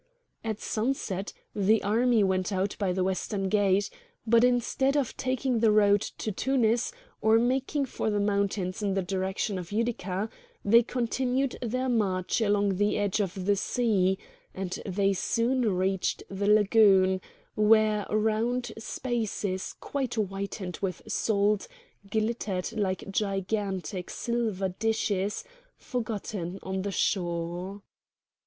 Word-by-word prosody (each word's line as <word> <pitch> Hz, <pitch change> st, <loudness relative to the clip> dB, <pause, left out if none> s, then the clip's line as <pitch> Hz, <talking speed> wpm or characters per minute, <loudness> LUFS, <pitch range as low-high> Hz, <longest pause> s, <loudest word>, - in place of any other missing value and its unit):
At 220 Hz, -2 st, -3 dB
sunset 215 Hz, -5 st, -2 dB, 0.2 s
the 210 Hz, +2 st, +3 dB
army 230 Hz, +1 st, +3 dB
went 190 Hz, 0 st, +1 dB
out 195 Hz, +1 st, -1 dB
by 195 Hz, -3 st, +1 dB
the 185 Hz, 0 st, 0 dB
western 190 Hz, +1 st, -1 dB
gate; 200 Hz, 0 st, +2 dB, 0.3 s
but 230 Hz, +1 st, +5 dB
instead 250 Hz, +3 st, +2 dB
of 275 Hz, -5 st, -1 dB
taking 255 Hz, -2 st, 0 dB
the 225 Hz, 0 st, +4 dB
road 205 Hz, -1 st, +5 dB
to 215 Hz, -, -4 dB
Tunis 240 Hz, -, +1 dB, 0.3 s
or 220 Hz, +1 st, +5 dB
making 265 Hz, +4 st, +1 dB
for 240 Hz, -, -2 dB
the 205 Hz, -1 st, 0 dB
mountains 200 Hz, -2 st, 0 dB
in 200 Hz, -2 st, 0 dB
the 195 Hz, -, +1 dB
direction 190 Hz, +2 st, -2 dB
of 175 Hz, 0 st, -8 dB
Utica, 210 Hz, -3 st, -1 dB, 0.4 s
they 230 Hz, +4 st, +7 dB
continued 250 Hz, +2 st, -1 dB
their 255 Hz, +2 st, -1 dB
march 200 Hz, -4 st, +1 dB
along 205 Hz, -2 st, +2 dB
the 205 Hz, +1 st, +2 dB
edge 205 Hz, 0 st, 0 dB
of 190 Hz, -2 st, -2 dB
the 205 Hz, +1 st, +3 dB
sea; 195 Hz, -3 st, +1 dB, 0.4 s
and 185 Hz, -1 st, -4 dB
they 195 Hz, +1 st, +2 dB
soon 235 Hz, +4 st, +1 dB
reached 190 Hz, 0 st, 0 dB
the 200 Hz, +1 st, -2 dB
Lagoon, 200 Hz, -3 st, +5 dB, 0.3 s
where 215 Hz, -1 st, +4 dB
round 220 Hz, +3 st, 0 dB
spaces 220 Hz, -5 st, -3 dB
quite 265 Hz, -4 st, -3 dB
whitened 195 Hz, -3 st, -3 dB
with 185 Hz, -3 st, -3 dB
salt 205 Hz, -1 st, +1 dB, 0.4 s
glittered 215 Hz, -4 st, -1 dB
like 195 Hz, -2 st, -2 dB
gigantic 195 Hz, -3 st, -2 dB
silver 220 Hz, -5 st, -1 dB
dishes 205 Hz, 0 st, -1 dB, 0.3 s
forgotten 210 Hz, -6 st, -4 dB
on 190 Hz, 0 st, -2 dB
the 200 Hz, +1 st, -3 dB
shore. 175 Hz, +1 st, -2 dB
205 Hz, 125 wpm, -28 LUFS, 190-230 Hz, 0.4 s, they